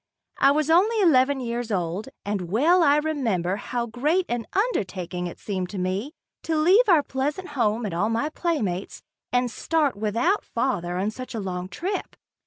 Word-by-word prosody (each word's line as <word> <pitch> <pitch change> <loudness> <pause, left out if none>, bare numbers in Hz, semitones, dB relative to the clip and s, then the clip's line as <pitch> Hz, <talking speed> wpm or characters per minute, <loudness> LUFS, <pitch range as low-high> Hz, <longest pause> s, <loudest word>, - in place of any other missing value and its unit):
I - - +6
was 305 +2 +2
only 420 +7 +4
eleven 285 -7 +4
years 240 -2 -3
old, 185 +5 -2 0.2
and 200 -4 -3
well 315 - +4
I 290 -1 +5
remember 230 - 0
how 235 +3 -3
great 295 +11 0
an 240 -2 -2
undertaking 185 - -1
it 175 - -8
seemed 185 -3 -4
to 205 - -6
me 190 - -2 0.3
to 325 - -2
leave 380 +9 +5
our 325 -5 +6
pleasant 290 +8 -3
home 235 -5 0
and 195 - -3
all 200 +6 +1
my 230 +7 0
playmates 225 - -2 0.3
and 245 -1 +1
start 305 -4 0
without 230 - 0
father 180 -8 -2
on 200 +3 0
such 255 +1 -8
a - - -2
long 185 -2 -4
trip. 385 - -4
245 Hz, 175 wpm, -25 LUFS, 200-310 Hz, 0.3 s, I